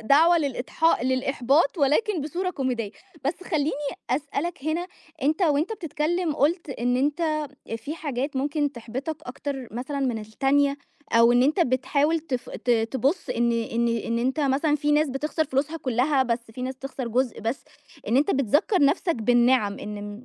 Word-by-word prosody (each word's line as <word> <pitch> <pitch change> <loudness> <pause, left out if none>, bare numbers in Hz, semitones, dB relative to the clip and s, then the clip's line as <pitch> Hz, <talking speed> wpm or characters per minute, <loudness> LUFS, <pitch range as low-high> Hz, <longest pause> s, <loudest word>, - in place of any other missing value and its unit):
الدعوة 320 +9 +5
للإضحا 285 +1 +1
للإحباط، 270 +4 +2
ولكن 320 - +2
بصورة 350 +6 -2
كوميدية، 250 - -2 0.3
بَس 350 +6 -2
خلّيني 310 -5 0 0.4
أسألك 290 +3 -2
هنا، 330 +3 -1 0.4
أنت 310 +6 +1
وأنت 310 +5 +2
بتتكلّم، 335 -2 -1
قُلت 325 +2 +1
إن 245 -1 0
أنت 300 +2 0 0.3
في 285 +7 -6
حاجات 280 -3 -3
ممكن 290 +1 0
تحبطك 250 +6 -5
أكتر 265 0 -5
مثلًا 270 +4 -3
من 250 -5 0
التانية، 275 +6 +1 0.4
أو 230 +1 +6
إن 245 +1 +4
أنت 300 +7 +2
بتحاول 285 +3 +2
تف 265 -6 -4
ت 245 - -3
تبُص 255 +8 +1
إن 235 0 +1
إن 230 +1 0
إن 230 0 -1
أنت 260 +5 0
مثلًا 290 +2 +2
في 295 0 +1
ناس 300 0 +3
بتخسر 300 +4 -1
فلوسها 280 +3 -1
كلّها، 265 0 +1
بَس 235 -2 -2
في 250 +3 -7
ناس 260 +1 -3
بتخسر 265 -2 -6
جُزء 245 0 0
بَس، 225 +5 -3 0.4
إن 235 - +3
أنت 285 +3 +3
بتذكّر 290 - +2
نَفْسك 330 +4 +2
بالنِعم، 240 -2 +3
إن 205 0 -6
275 Hz, 155 wpm, -25 LUFS, 245-305 Hz, 0.4 s, أو